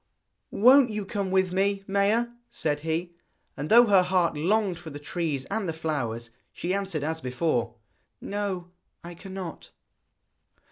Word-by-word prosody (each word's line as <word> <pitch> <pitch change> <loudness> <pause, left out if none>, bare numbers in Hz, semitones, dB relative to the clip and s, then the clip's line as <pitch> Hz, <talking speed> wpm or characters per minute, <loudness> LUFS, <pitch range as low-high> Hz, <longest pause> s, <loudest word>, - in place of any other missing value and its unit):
'Won't 255 +4 +6
you 210 -2 -3
come 195 0 -3
with 190 -1 +2
me, 195 +1 +1
Maia?' 205 +4 +2 0.2
said 150 -2 -1
he. 165 +3 -3 0.4
And 145 +2 -5
though 235 +2 +8
her 200 -4 +5
heart 180 -2 +1
longed 185 +3 +1
for 170 -2 -9
the 145 - -7
trees 145 -2 -3
and 200 -4 -1
the - - -2
flowers, 120 -8 -3 0.2
she 180 +2 -3
answered 195 -7 -2
as 160 +1 -2
before: 125 -2 -1 0.4
'No, 195 -4 -4 0.3
I 175 +1 -8
cannot.' 190 -1 -8
180 Hz, 145 wpm, -27 LUFS, 160-200 Hz, 0.4 s, though